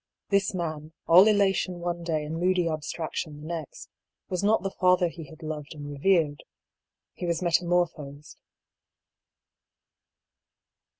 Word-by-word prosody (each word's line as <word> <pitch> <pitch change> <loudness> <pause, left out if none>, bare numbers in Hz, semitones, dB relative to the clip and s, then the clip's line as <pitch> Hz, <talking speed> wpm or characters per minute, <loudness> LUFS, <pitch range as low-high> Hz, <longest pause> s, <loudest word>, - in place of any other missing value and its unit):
This 200 -1 +1
man, 155 -3 -4
all 180 +5 +8
elation 195 -3 +2
one 175 0 -3
day 160 -3 -1
and 160 +2 -4
moody 180 -1 +2
ab 155 -1 -1
straction 155 -1 -5
the 150 - -10
next, 160 -3 -6 0.4
was 185 +1 -2
not 215 +1 +3
the 195 - -2
father 180 -2 +3
he 165 -1 -9
had 155 +3 -14
loved 155 0 -6
and 145 -1 -8
revered. 150 -1 +1 0.7
He 175 - -5
was 170 +1 -1
metamorphosed. 170 -4 -1
170 Hz, 130 wpm, -27 LUFS, 155-180 Hz, 0.7 s, all